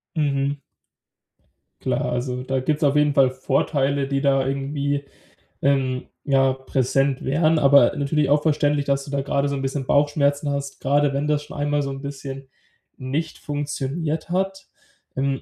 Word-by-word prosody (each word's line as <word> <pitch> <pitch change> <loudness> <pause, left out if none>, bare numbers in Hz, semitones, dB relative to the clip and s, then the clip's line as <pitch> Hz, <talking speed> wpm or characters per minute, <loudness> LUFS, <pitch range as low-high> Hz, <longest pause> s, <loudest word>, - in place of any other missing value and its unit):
Mhm. 140 -2 0 1.2
Klar, - - -1
also 125 +1 -2
da 130 0 -1
gibt's 150 +4 -1
auf 145 -1 +3
jeden 150 0 +3
Fall 135 -2 +5
Vorteile, 135 +1 0
die 135 0 -1
da 135 -2 +2
irgendwie 140 +1 -2 0.6
ähm, 130 -2 +1 0.2
ja, 135 -2 +3
präsent 135 +1 0
wären. 155 +4 +2
Aber 140 -4 +5
natürlich 145 0 0
auch 145 +1 +4
verständlich, 150 -2 +1
dass 140 0 0
du 140 - -9
da 140 -1 0
grade 140 +1 0
so 140 - -1
'n 135 - -3
bisschen 135 0 -3
Bauchschmerzen 145 0 +2
hast, 140 -1 -4
grade 145 +1 +2
wenn 140 +2 -1
das 150 -1 +1
schon 150 - -10
einmal 145 0 0
so 140 - -3
'n 135 0 -6
bisschen 135 -1 -7 0.5
nicht 145 +5 -3
funktioniert 150 +2 -3
hat. 190 +2 -2 0.5
Ähm, 135 0 -1
140 Hz, 160 wpm, -23 LUFS, 135-145 Hz, 1.2 s, Fall